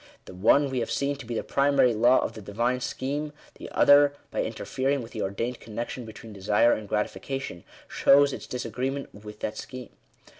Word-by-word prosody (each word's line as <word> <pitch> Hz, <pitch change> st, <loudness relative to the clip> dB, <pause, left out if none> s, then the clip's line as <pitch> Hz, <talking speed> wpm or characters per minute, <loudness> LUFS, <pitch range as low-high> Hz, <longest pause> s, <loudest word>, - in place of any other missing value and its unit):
The -, -, -11 dB
one 130 Hz, +9 st, +3 dB
we 130 Hz, -, -1 dB
have 115 Hz, -, -2 dB
seen 140 Hz, +1 st, 0 dB
to 130 Hz, -5 st, -10 dB
be 120 Hz, -, -3 dB
the -, -, -2 dB
primary 140 Hz, -3 st, +3 dB
law 120 Hz, +4 st, +5 dB
of -, -, -3 dB
the 110 Hz, -, -9 dB
Divine 120 Hz, +5 st, -1 dB
scheme; 145 Hz, +4 st, -3 dB, 0.3 s
the -, -, -8 dB
other, 145 Hz, 0 st, +5 dB, 0.2 s
by -, -, -1 dB
interfering 135 Hz, 0 st, -2 dB
with 115 Hz, -, -11 dB
the 110 Hz, -, -5 dB
ordained 115 Hz, +6 st, -3 dB
connection 120 Hz, +2 st, -6 dB
between 110 Hz, 0 st, -11 dB
desire 105 Hz, +4 st, +3 dB
and 105 Hz, -2 st, -5 dB
gratification, 105 Hz, -1 st, -3 dB, 0.2 s
shows 140 Hz, 0 st, +4 dB
its -, -, -7 dB
disagree 125 Hz, +1 st, -3 dB
ment 140 Hz, 0 st, -6 dB
with 105 Hz, +1 st, -11 dB
that 105 Hz, -, -3 dB
scheme. 130 Hz, -1 st, -8 dB
125 Hz, 190 wpm, -27 LUFS, 110-140 Hz, 0.3 s, law